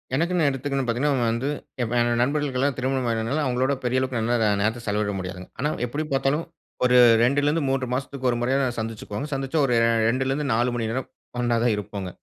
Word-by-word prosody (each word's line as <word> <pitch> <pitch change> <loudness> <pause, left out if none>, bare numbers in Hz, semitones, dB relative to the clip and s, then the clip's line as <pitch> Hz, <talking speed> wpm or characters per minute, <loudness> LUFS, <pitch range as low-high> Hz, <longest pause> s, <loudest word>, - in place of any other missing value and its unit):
எனக்குனு 170 +2 +1
எடுத்துக்குனு 135 0 -2
பாத்தீங்கனா 125 +1 +1
வந்து 120 +5 -1 0.3
ஏ - - +2 0.4
நண்பர்களுக்கெல்லாம் 140 0 0
திருமணம் 130 -1 -1
ஆனதால 115 +7 -1
அவங்களோட 130 +2 +1
பெரிய 125 +1 +1
அளவுக்கு 115 -5 +1
நேரத்த 110 +3 -1
செலவிட 105 0 0
முடியாதுங்க. 90 0 -7
ஆனா 145 +3 +1 0.2
எப்படி 145 +6 -3
பார்த்தாலும், 135 +4 +1 0.4
ஒரு 125 0 +5 0.3
2ல 140 +4 +2
இருந்து 155 -1 0
3 130 -2 -1
மாசத்துக்கு 130 0 -2
1 120 - -2
முறையாவது 130 0 0
சந்துசுக்குவோங்க. 110 +4 -5
சந்திச்சா 135 +3 -1
ஒரு 125 - +2 0.3
2லருந்து 135 +3 0
4 120 +2 +1
மணி 115 -2 -2
நேரம் 130 +1 -3 0.3
ஒண்ணா 120 -1 +1
தான் 115 -3 +3
இருப்போங்க. 100 -2 -5
130 Hz, 165 wpm, -24 LUFS, 115-140 Hz, 0.4 s, ஒரு